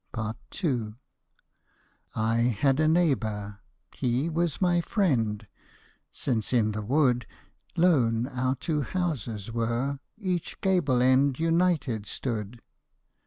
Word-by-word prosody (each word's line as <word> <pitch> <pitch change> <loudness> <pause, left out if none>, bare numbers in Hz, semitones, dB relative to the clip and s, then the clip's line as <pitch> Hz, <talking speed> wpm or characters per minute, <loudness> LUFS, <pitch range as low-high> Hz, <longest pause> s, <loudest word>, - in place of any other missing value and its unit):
II 120 -9 -1 1.2
I 110 +1 +1
had 125 +4 +2
a 155 - +3
neighbour 110 - 0 0.2
— - - -28
he 125 +6 0
was 165 -2 0
my 175 -2 +3
friend. 115 - 0 0.7
Since 115 -3 -2
in 110 -3 +3
the 105 0 -3
wood 125 0 +2 0.5
Lone 125 -10 +3
our 130 0 -1
two 150 +3 -1
houses 125 - -3
were^ 120 +4 -1 0.2
each 185 -5 -3
gable 150 -10 +2
end 130 +1 +3
United 165 - +1
stood. 115 -2 -4
130 Hz, 110 wpm, -27 LUFS, 115-160 Hz, 1.2 s, a